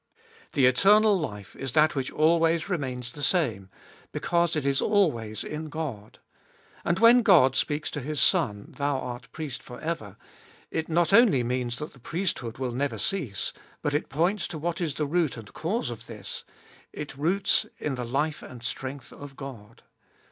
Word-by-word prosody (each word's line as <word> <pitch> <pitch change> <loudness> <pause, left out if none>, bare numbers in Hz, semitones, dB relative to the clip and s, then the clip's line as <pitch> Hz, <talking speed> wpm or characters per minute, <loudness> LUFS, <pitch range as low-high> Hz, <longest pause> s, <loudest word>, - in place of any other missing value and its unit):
The 135 -3 +4
eternal 205 - +6
life 105 - -5
is 135 -2 -5
that 155 +2 +5
which 135 -2 -2
always 165 +1 +3
remains 125 -8 -3
the 145 - -8
same, 125 - +1 0.4
because 170 -1 +1
it 150 -3 -1
is 140 -1 +2
always 120 - +1
in 155 +1 -5
God. 135 -10 -5 0.7
And 170 - +1
when 230 +3 +7
God 165 - +6
speaks 150 +1 0
to 150 - -3
His 145 +2 -3
Son, 110 - +2
Thou 140 -1 +1
art 125 -2 -6
Priest 150 -6 -5
for 125 - -10
ever, 110 - -4 0.5
it 160 0 -2
not 170 +1 +2
only 200 - +6
means 125 0 -1
that 150 +1 -6
the 135 - -17
priesthood 160 - -3
will 130 -2 -2
never 140 +4 -1
cease, 150 - -2 0.3
but 145 - 0
it 150 - -1
points 175 +8 +1
to 160 - -6
what 170 +3 -2
is 155 -5 -1
the 150 - 0
root 160 -3 0
and 110 -2 -11
cause 170 - -2
of 115 0 -9
this; 110 -3 -6 0.5
it 145 -2 -7
roots 190 +8 +2
in 150 - -2
the 125 -1 -3
life 145 +6 -1
and 120 -2 -10
strength 130 +3 -5
of 140 -1 -10
God. 115 -6 -10
145 Hz, 175 wpm, -27 LUFS, 125-170 Hz, 0.7 s, when